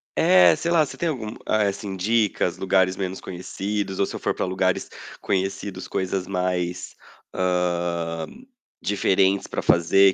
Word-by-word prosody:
É, 90 -3 +6
sei 170 - -2
lá, 165 -2 +5
você - - -10
tem 170 - 0
algum, 115 -8 -4
eh 110 -1 +2
assim, 100 0 -4
dicas, 105 +2 +1
lugares 95 -1 +2
menos 95 -1 -4
conhecidos, 95 +2 -4
ou 100 - +3
se - - -7
eu - - -5
for - - 0
pra - - -2
lugares 95 0 0 0.3
conhecidos, 95 0 -2
coisas 95 0 -2
mais, 90 -1 -2 0.4
hã, 85 -2 -1 0.6
diferentes 95 -1 +2
pra - - -3
fazer 95 +3 +5
95 Hz, 150 wpm, -24 LUFS, 90-100 Hz, 0.6 s, É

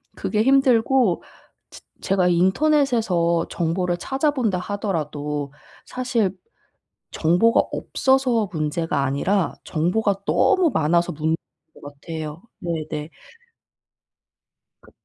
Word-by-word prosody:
그게 215 -1 -1
힘들고 255 - +3 0.5
즈 - - -13 0.2
제가 185 -2 +1
인터넷에서 190 - +2
정보를 175 +1 -1
찾아본다 265 - 0
하더라도 150 -8 -3 0.3
사실 235 -7 -1 0.8
정보가 180 +9 +3
없어서 260 -6 +1
문제가 155 -2 -1
아니라 170 +8 0
정보가 195 +5 0
너무 370 -5 +3
많아서 170 +2 +2
문제인 160 +2 -1 0.4
것 - - -17
같아요. 155 +2 -7 0.2
네네. 160 -2 -4 1.7
그 - - -18
180 Hz, 225 characters per minute, -22 LUFS, 160-230 Hz, 1.7 s, 힘들고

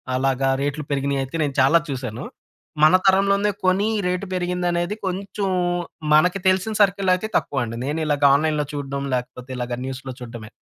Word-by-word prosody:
అలాగా 135 0 +1
రేట్లు 145 +1 -2
పెరిగినయి 140 0 0
అయితే 135 +5 -8
నేను 140 -2 -2
చాలా 150 +6 +5
చూసాను. 125 -5 -5 0.6
మన 155 +4 +7
తరంలోనే 200 +2 +3
కొని 190 +3 +3 0.2
రేట్ 180 +2 -1
పెరిగింది 180 0 -1
అనేది 175 +4 -1
కొంచెం 195 +2 -3 0.7
మనకి 180 +5 +4
తెలిసిన 190 +4 +2
సర్కిల్ 195 -1 +3
అయితే 185 +4 -1
తక్కువండి. 120 -5 -2
నేను 150 +3 -2
ఇలాగ 145 -1 0
ఆన్‌లైన్‌లో 150 0 +1
చూడం 140 -1 -4
లేకపోతే 125 +1 -6
ఇలాగా 125 0 -3
న్యూస్‌లో 130 0 -6
చూడమే. 115 -3 -9
150 Hz, 155 wpm, -22 LUFS, 135-185 Hz, 0.7 s, మన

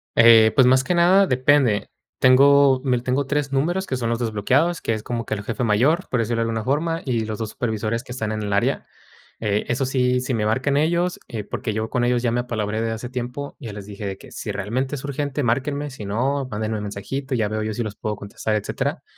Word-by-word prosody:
Eh, 115 -1 +7
pues, 130 - +6
más 130 +1 +5
que 180 - 0
nada, 185 +3 +5
depende. 130 -5 +2 0.3
Tengo 135 +1 +6
m 130 -2 +2
l 120 - -3
tengo 130 +2 0
3 145 -1 -1
números 175 +8 0
que 130 - -2
son 115 -2 -2
los 115 - 0
desbloqueados, 125 +10 +1
que 115 - 0
es 110 - -4
como 120 -2 -3
que 110 - -2
el 100 - -6
jefe 115 +3 -3
mayor, 125 - +2
por 125 - 0
decirlo 115 +1 0
de - - +2
alguna 115 -1 -2
forma, 165 +6 0
y 115 -4 0
los 110 -1 -4
2 110 -2 -4
supervisores 110 0 -2
que 125 - -11
están 110 -4 -3
en 110 - -3
el 100 -1 -2
área, 100 - +1 0.5
eh, 105 -1 0
esos 130 +2 0
sí, 125 -1 +2
si 130 0 -2
me 105 -2 0
marcan 130 +5 +1
ellos, 170 +4 +1
eh, 110 -3 -5
porque 110 +2 -4
yo 110 +1 -2
con 125 - +1
ellos 120 0 +1
ya 120 - +1
me 120 - 0
apalabré 110 -3 -2
de 115 - -1
hace 110 +2 -5
tiempo, 125 +3 -5
ya 115 -7 -7
les 100 -1 -8
dije 100 0 -7
de 95 - -4
que: - - -15
"Si - - -5
realmente 125 +8 -2
es 130 - -7
urgente, 145 0 -2
márquenme, 140 +5 -1
si 110 -6 -8
no, 130 +6 -1
mándenme 110 +1 -2
el 105 - -5
mensajito 130 +7 -4
y - - 0
ya 105 - +1
veo 110 0 -2
yo 110 - -2
si 120 - -2
los 105 -1 -5
puedo 105 -1 -3
contestar, 105 +2 -3
etcétera". 105 - -2
120 Hz, 245 wpm, -22 LUFS, 110-135 Hz, 0.5 s, Eh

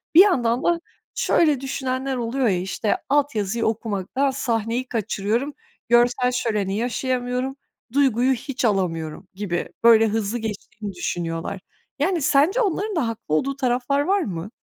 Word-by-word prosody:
Bir 350 - +11
yandan 245 - +3
da 340 -1 +2 0.3
şöyle 300 -6 +3
düşünenler 265 0 -2
oluyor 245 +2 0
ya, 185 -4 +2
işte, 190 +4 -1
alt 285 -1 +2
yazıyı 215 +2 -1
okumaktan 225 +4 -1
sahneyi 240 -1 -1
kaçırıyorum, 225 +4 -1 0.4
görsel 245 +1 +4
şöleni 210 -6 -1
yaşayamıyorum, 250 +2 -1 0.4
duyguyu 265 -2 +3
hiç 260 0 -3
alamıyorum 180 -5 -1
gibi, 185 -3 -3
böyle, 225 -1 +7
hızlı 220 +1 -1
geçtiğini 210 -1 -6
düşünüyorlar. 175 +1 -3 0.4
Yani, 340 +3 +1
sence 300 - +3
onların 410 0 -1
da 295 -8 +1
haklı 220 -9 -3
olduğu 275 - 0
taraflar 260 +1 0
var 390 +6 +2
mı? 180 +1 -5
240 Hz, 135 wpm, -23 LUFS, 210-275 Hz, 0.4 s, Bir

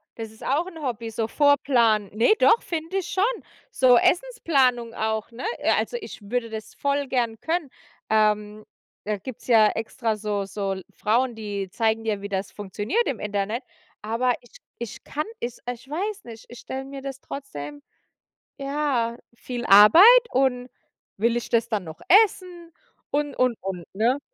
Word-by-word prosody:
Das 225 -1 -7
ist 220 - -15
auch 300 +6 +1
'n 330 -4 -10
Hobby, 235 -4 -4
so 220 0 -2
Vorplanen. 240 -8 +3
Ne, 235 - +5
doch, 455 - +5
finde 335 +3 -3
ich 375 - -2
schon. 440 +6 0 0.3
So 250 -2 +5
Essensplanung 270 - +2
auch, 220 0 -2
ne? 245 - -7
Äh, - - +1
also, 485 - 0
ich - - -9
würde 230 +3 -3
das 220 -1 -7
voll 280 0 -1
gern 235 -4 -1
können. 325 -3 -2 0.4
Ähm, 210 -1 +1 0.4
da 210 0 -2
gibt's 230 +5 -10
ja 220 -3 +6
extra 225 0 -2
so 205 -2 -2
so 195 0 -3
l 190 -1 -7
Frauen, 235 +3 +1
die 200 -3 -5
zeigen 225 +2 0
dir, 210 -3 -2
wie 200 - -6
das 195 0 -3
funktioniert 210 - -2
im 255 - -2
Internet. 210 +4 -2 0.4
Aber 230 +4 0
ich 245 - -18 0.2
ich 235 -3 -7
kann 300 +1 -3
es 240 0 -5
ich 250 +2 -11
weiß 400 +6 -3
nicht, 225 -2 -11
ich 240 - -11
stelle 265 0 -6
mir 275 0 -8
das 270 -1 -6
trotzdem 145 - -8 0.8
ja, 275 -5 -1 0.2
viel 240 0 -6
Arbeit 210 - +8 0.3
und 250 -1 +1 0.5
will 230 +3 +1
ich 240 - -3
das 230 0 +1
dann 210 -5 -2
noch 160 +1 -10 0.2
essen 350 -4 -9 0.4
und, 290 -1 -1
und, 250 -3 +1
und, 185 -3 -5
ne? 240 +7 +2
235 Hz, 170 wpm, -24 LUFS, 215-275 Hz, 0.8 s, Arbeit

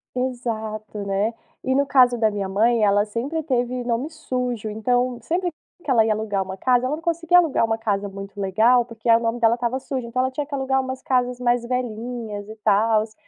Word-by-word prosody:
Exato, 220 -4 -3
né. 200 +3 0 0.3
E 260 0 0
no 280 +1 +2
caso 250 -3 +5
da 220 -1 +3
minha 200 -2 -3
mãe, 225 +3 +2
ela 205 0 +4
sempre 260 +9 -3
teve 250 -3 -1
nome 240 +5 -1
sujo, 250 -8 -3
então, 245 +3 0
sempre 350 +8 -1 0.3
que 280 - -3
ela 225 -3 +5
ia 220 - +2
alugar 210 -2 -1
uma 190 0 -6
casa, 250 +3 +2
ela 295 +4 -1
não 325 - -11
conseguia 335 +1 +3
alugar 320 -9 +3
uma 225 0 0
casa 205 -3 -1
muito 195 +1 -8
legal, 225 +6 +3
porque 230 -1 -8
aí 230 - +7
o 230 - 0
nome 230 +1 -1
dela 230 0 +4
estava 245 +2 -1
sujo. 260 -2 -4
Então 255 +2 -2
ela 260 0 +1
tinha 290 +3 -3
que 290 - -7
alugar 265 0 +1
umas 260 0 -4
casas 250 -4 0
mais 240 -1 +1
velhinhas 230 -3 -4
e 220 - -9
tals, 215 +1 +2
240 Hz, 210 wpm, -23 LUFS, 215-255 Hz, 0.3 s, aí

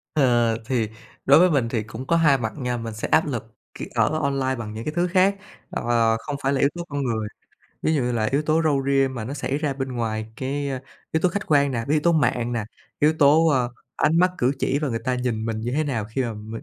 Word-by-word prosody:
Ờ, 120 -5 +3
thì 115 -3 0 0.4
đối 140 +3 +7
với 180 +1 +6
mình 130 -6 +1
thì 115 -2 -1
cũng 115 +4 -8
có 170 - +3
2 155 -4 +4
mặt 110 -3 -3
nha, 125 -3 -2
mình 115 -1 -5
sẽ 110 - -4
áp 160 - +3
lực 115 -5 -5 0.2
khi - - -6
ở 155 +1 +2
online 135 -2 0
bằng 110 -3 -6
những 110 +2 -6
cái 150 - -3
thứ 175 +2 +1
khác, 190 +2 +3 0.3
ờ, 115 -1 +1
không 145 - -5
phải 135 +1 +2
là 135 - 0
yếu 140 - +4
tố 175 - -4
con 145 -1 -2
người. 110 -4 -1 0.6
Ví 160 - +2
dụ 145 - +1
như 125 0 -1
là 115 -2 0
yếu 140 +2 +2
tố 155 +2 +2
râu 145 -3 +2
ria 135 -1 +3
mà 120 -4 -5
nó 130 +5 -5
xảy 140 -1 -2
ra 150 -2 -1
bên 135 -1 -4
ngoài 110 -3 -2
cái, 140 +2 -2
a, 130 -1 -3 0.3
yếu 160 - +1
tố 180 - +3
khách 205 +4 -4
quan 140 -2 +3
nè, 120 - -1
cái 145 - 0
yếu 155 - +3
tố 170 +3 +3
mạng 120 -6 +1
nè, 115 -3 -2 0.3
yếu 150 +2 +4
tố, 150 +3 +5
ờ, 130 -5 +1 0.3
ánh 160 +2 +2
mắt 180 +1 +4
cử 125 +2 +2
chỉ 135 - 0
và 150 -1 -1
người 115 -3 -2
ta 130 +1 -1
nhìn 125 -3 -2
mình 110 -1 -2
như 120 +2 -3
thế 155 +3 +1
nào 120 -7 -2
khi 115 +5 -2
mà 120 -2 -2
mình 110 +2 -8
130 Hz, 270 wpm, -23 LUFS, 115-150 Hz, 0.6 s, đối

